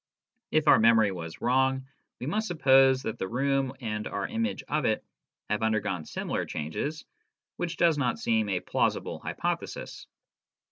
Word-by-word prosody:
If 155 0 +1
our - - +7
memory 110 -2 +5
was 85 -3 -7
wrong, 130 +1 +2 0.3
we - - -5
must 215 +9 -1
suppose 135 -5 +5
that 110 - -4
the 95 - -2
room 135 +3 0
and 105 -2 -3
our - - -3
image 230 +1 -2
of 150 0 0
it 110 - 0 0.4
have 105 +1 -1
undergone 105 -6 0
similar - - -3
changes, 110 - -4 0.5
which 175 -1 -3
does 165 -3 +3
not 125 -3 0
seem 110 -2 +1
a 90 -2 0
plausible - - -1
hypothesis. - - -4
130 Hz, 150 wpm, -28 LUFS, 105-145 Hz, 0.5 s, our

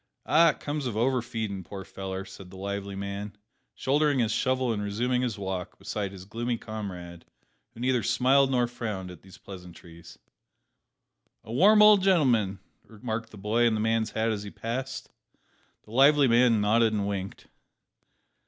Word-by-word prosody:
"Ah, 165 +2 +5
it - - +1
all - - -24
comes 145 -2 -3
of 110 -3 -4
over 125 +2 +1
feedin', 110 -4 -5
poor 95 +1 -8
feller," 95 0 -6
said 95 -2 -12
the 95 - -12
lively 100 0 -5
man, 100 +1 -5 0.4
shouldering 145 +1 +1
his 115 -3 +1
shovel 130 +1 0
and 105 - -3
resuming 120 +5 -1
his 120 -4 -2
walk 95 -2 -5
beside 100 -2 -4
his 95 -1 -11
gloomy 120 +3 -3
comrade, 90 -6 -7 0.5
who 115 - -10
neither 125 -1 +1
smiled 135 +5 +3
nor 125 -2 +2
frowned 110 -6 -5
at 90 - -13
these 95 -1 -15
pleasantries. 85 -3 -12 1.3
"A 110 - -8
warm 210 - +6
old 210 -2 +7
g'n'l'm'n!" 125 - +2 0.3
remarked 115 0 -6
the 105 - -13
boy 110 +4 +1
in 115 - +1
the - - -2
man's 110 0 +1
hat 110 +2 -1
as 105 -2 -3
he 105 - -7
passed. 130 +6 -5 0.7
The 105 - -17
lively 140 +3 +5
man 120 -2 +4
nodded 110 +2 +3
and 100 -2 -1
winked. 100 -1 -5
110 Hz, 170 wpm, -27 LUFS, 100-125 Hz, 1.3 s, old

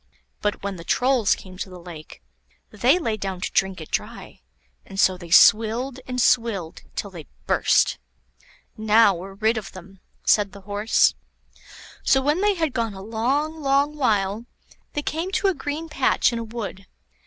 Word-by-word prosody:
But 205 -1 -2
when 200 -2 -4
the 165 - -9
Trolls 245 +2 +2
came 185 -1 -13
to 195 - -4
the 180 -1 -11
lake, 170 -3 -11 0.5
they 245 - +3
lay 230 -11 -2
down 195 -2 -4
to - - -3
drink 190 -2 0
it 160 - -10
dry; - - -5 0.4
and 195 - -9
so 190 -2 +4
they 175 -2 -11
swilled 230 +8 +4
and 250 0 -3
swilled 225 -9 +1
till 200 - -4
they 165 -6 -10 0.2
burst. - - +2 0.8
"Now 220 -1 +4
we're 190 +2 -8
rid 220 +3 +1
of 195 -5 -11
them," 190 +1 -13 0.3
said 205 -2 +3
the 200 - -11
Horse. 205 +3 +2 0.9
So 270 - +4
when 295 +7 +1
they 415 -1 +2
had 320 -6 -1
gone 230 -4 -2
a 190 - -9
long, 275 +9 -1
long 280 +1 +1
while, 215 -4 0 0.5
they 295 - -3
came 325 +6 -3
to 390 - +2
a - - +1
green 305 +1 -5
patch 275 -4 +1
in 235 - -2
a - - -4
wood. 215 -4 -7
220 Hz, 175 wpm, -23 LUFS, 195-270 Hz, 0.9 s, so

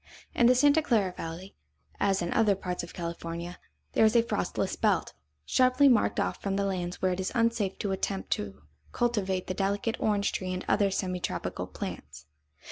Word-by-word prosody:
In 240 - +4
the 250 - +6
Santa 290 +4 +5
Clara 215 -10 +1
valley, 165 +4 -7 0.4
as 195 -3 +2
in 175 - -2
other 215 -3 +3
parts 180 -2 -4
of 170 - -8
California, 170 0 -5 0.3
there - - +4
is 220 +1 +4
a 235 - +6
frostless - - -2
belt, - - +1 0.3
sharply 255 +2 +4
marked 245 -5 +3
off - - -1
from 195 -1 -1
the 200 0 0
lands 180 -2 -3
where 185 - +3
it 180 - -2
is 190 - -2
unsafe 230 -4 +1
to 200 - -2
attempt 195 0 -3
to 95 -6 -3 0.3
cultivate 195 -6 0
the 185 - -3
delicate 200 +4 -1
orange 205 -2 +1
tree 185 -1 -3
and 180 - -5
other 200 -2 +3
semi 185 -1 -2
tropical - - -3
plants. 75 +2 -7
195 Hz, 185 wpm, -29 LUFS, 180-225 Hz, 0.4 s, the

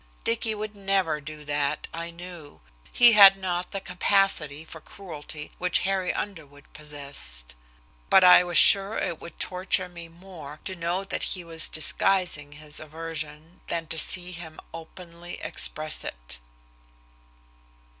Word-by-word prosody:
Dicky 230 -1 0
would 210 0 -6
never 195 -6 0
do 150 +1 -10
that, 145 0 -2
I 170 +1 -5
knew. 170 -3 -11 0.3
He 240 -1 +8
had 200 -3 +9
not 180 -2 -3
the 195 - -3
capacity 180 -5 +1
for 160 0 -11
cruelty 155 -6 -9
which 180 0 +1
Harry 190 -1 0
Underwood 150 -8 -7
possessed. 140 - -7 0.6
But 190 - +6
I 180 0 +8
was 175 -2 -1
sure 200 +2 +7
it 165 - -3
would 170 - -11
torture 185 0 0
me 170 -1 -10
more 165 -4 -12
to 190 - -5
know 175 +2 -2
that 195 - -4 0.2
he 180 - -8
was 165 -1 -3
disguising 155 -2 -1
his 150 0 -5
aversion 155 +1 -7
than 165 -1 -3
to 160 - 0
see 180 +3 +3
him 170 -3 -9
openly 170 +1 -10
express 155 0 -1
it. - - -7
170 Hz, 140 wpm, -26 LUFS, 150-185 Hz, 0.6 s, had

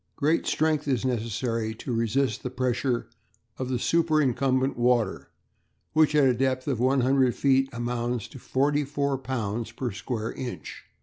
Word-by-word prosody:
Great 155 +3 +1
strength 155 -1 +1
is 130 -4 0
necessary 115 -1 -1
to 125 +2 -5
resist 115 +2 0
the 125 - -4
pressure 125 0 -1 0.5
of 130 -1 -1
superincumbent 135 -5 +2
water, 120 -4 +1 0.6
which 155 -1 +4
at 145 -2 +5
a 130 - +4
depth 130 +1 0
of 130 -5 0
100 130 0 +3
feet 135 -1 +3
amounts 120 -1 -2
to 135 - -11
44 140 +1 0
lbs. 115 -3 -3
per 125 -1 -2
square 110 +2 -4
inch. 125 -2 -7
130 Hz, 135 wpm, -26 LUFS, 120-135 Hz, 0.6 s, at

